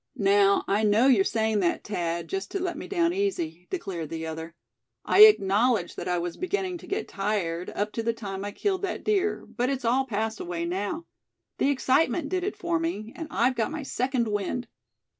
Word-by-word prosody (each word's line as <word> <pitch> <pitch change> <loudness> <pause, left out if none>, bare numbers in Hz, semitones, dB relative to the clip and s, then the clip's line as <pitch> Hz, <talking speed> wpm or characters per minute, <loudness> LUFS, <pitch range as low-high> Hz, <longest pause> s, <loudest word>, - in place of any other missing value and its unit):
"Now, 200 0 +4
I 200 +2 +2
know 215 +3 +4
you're 245 -8 +5
saying 220 0 +1
that, 175 -3 0
Thad, 170 -4 -2
just 390 0 -4
to 395 - -3
let 355 -2 -2
me 300 - -7
down 345 -3 +1
easy," 180 - -2
declared 185 - -4
the 160 0 -4
other. 160 +1 -6 0.5
"I 425 - +9
acknowledge 210 - +3
that - - -6
I 180 0 +1
was 175 0 -3
beginning 370 -1 -2
to - - -13
get 415 +2 -2
tired, 195 -4 -2
up 210 +1 -1
to 230 - -3
the 230 +1 +1
time 200 -4 -6
I 205 - -4
killed 380 - -1
that 395 - -3
deer; 415 -1 0
but 245 +1 -2
it's 270 -3 -2
all 260 +3 +2
passed 220 -1 -2
away 170 -1 -3
now. 200 - -3 0.5
The 275 - +3
excitement 285 +3 +2
did 370 -1 -1
it 405 +2 -3
for 340 -2 0
me; 245 -10 -3
and 325 - -6
I've 255 -3 +2
got 225 -3 -1
my 310 -1 -5
second 255 -2 -1
wind." 210 +4 -2
230 Hz, 200 wpm, -27 LUFS, -, 0.5 s, I